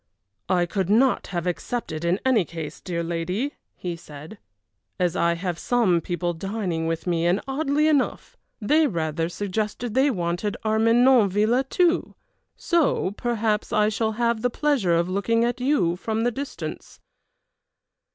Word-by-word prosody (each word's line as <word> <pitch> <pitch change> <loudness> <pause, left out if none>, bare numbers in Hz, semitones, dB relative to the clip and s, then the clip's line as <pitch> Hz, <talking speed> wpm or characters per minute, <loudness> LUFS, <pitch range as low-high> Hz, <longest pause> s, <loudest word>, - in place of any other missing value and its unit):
"I 180 -2 +3
could 190 +1 -2
not 245 +5 +3
have 175 -2 -3
accepted 180 -2 -3
in 175 +3 +1
any 250 -7 +4
case, 160 -2 -7
dear 170 -2 -3
lady," 180 - -2 0.2
he 175 -2 -4
said, 155 +5 -11 0.6
"as 180 -1 +1
I 170 0 +2
have 175 -1 -3
some 210 -9 +2
people 175 0 -2
dining 180 -2 -3
with 165 0 -2
me, 170 -1 +1
and, 180 +3 +2
oddly 290 +2 +1
enough, 290 -4 0 0.2
they 300 +8 +3
rather 165 - -2
suggested 210 +4 -3
they 265 +3 +4
wanted 180 -1 -2
Armenonville 230 +1 +4
too, 350 -1 +1 0.4
so 335 - +1
perhaps 220 -1 -1
I 210 0 +3
shall 220 0 -1
have 235 0 0
the 245 - +1
pleasure 245 - +1
of 170 +1 +1
looking 215 +5 +1
at 245 +1 -2
you 250 - +2
from 220 +4 -2
the 245 - +2
distance." 275 +4 -7
210 Hz, 145 wpm, -24 LUFS, 175-240 Hz, 0.6 s, any